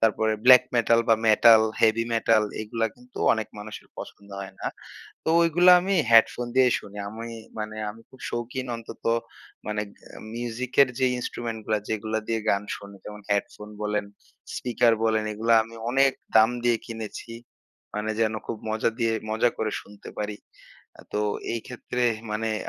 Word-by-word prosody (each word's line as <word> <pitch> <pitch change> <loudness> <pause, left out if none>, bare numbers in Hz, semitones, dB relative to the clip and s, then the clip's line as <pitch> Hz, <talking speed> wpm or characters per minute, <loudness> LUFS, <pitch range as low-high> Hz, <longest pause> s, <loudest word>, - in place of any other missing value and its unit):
তারপরে 110 0 +2
black 125 -1 +9
metal 115 0 +4
বা 115 - +7
metal, 110 +1 +7 0.2
heavy 115 +1 +4
metal 115 -1 +3 0.2
এগুলা 115 +1 -1
কিন্তু 125 0 -14
অনেক 110 -1 -2
মানুষের 105 +1 -9
পছন্দ 100 0 -10
হয় 95 -1 -8
না। - - -4 0.6
তো - - -2
ওইগুলা 175 +2 +6
আমি 195 +2 0 0.2
হেডফোন 115 +1 +5
দিয়েই 130 -2 +5
শুনি। 105 0 -11
আমি 115 +2 -7 0.3
মানে 110 0 -5
আমি 110 - -13
খুব 130 - -18
শৌখিন 125 +2 -4
অন্তত 115 - -11 0.6
মানে 105 0 -1 0.4
এ - - -9 0.2
মিউজিক 120 +1 -4
এর 130 - +3
যে 130 - +3
ইন্সট্রুমেন্ট 115 -2 -4
গুলা 110 -1 +1
যেগুলা 110 0 -2
দিয়ে 115 -1 0
গান 100 0 +1
শুনি, 100 0 -12
যেমন 105 0 -9
হেডফোন 105 +1 -2
বলেন, 105 -1 -1 0.5
স্পিকার 120 -1 +2
বলেন 110 -1 +2
এগুলা 115 +2 +2
আমি 115 +1 -13 0.2
অনেক 135 +1 +4 0.2
দাম 110 +1 +7
দিয়ে 120 -1 +4
কিনেছি। 115 0 -7 0.6
মানে 110 +1 -2
যেন 110 0 +2
খুব 115 - -3
মজা 110 +1 +1
দিয়ে, 115 -1 +1 0.2
মজা 110 +2 +2
করে 110 -1 -1
শুনতে 100 0 -13
পারি। 105 0 -3 0.6
আ - - -10
তো 105 - 0 0.3
এই 115 - -2
ক্ষেত্রে 125 0 -4 0.3
মানে 110 +1 -1
আমি 110 - -1
115 Hz, 165 wpm, -25 LUFS, 105-120 Hz, 0.6 s, black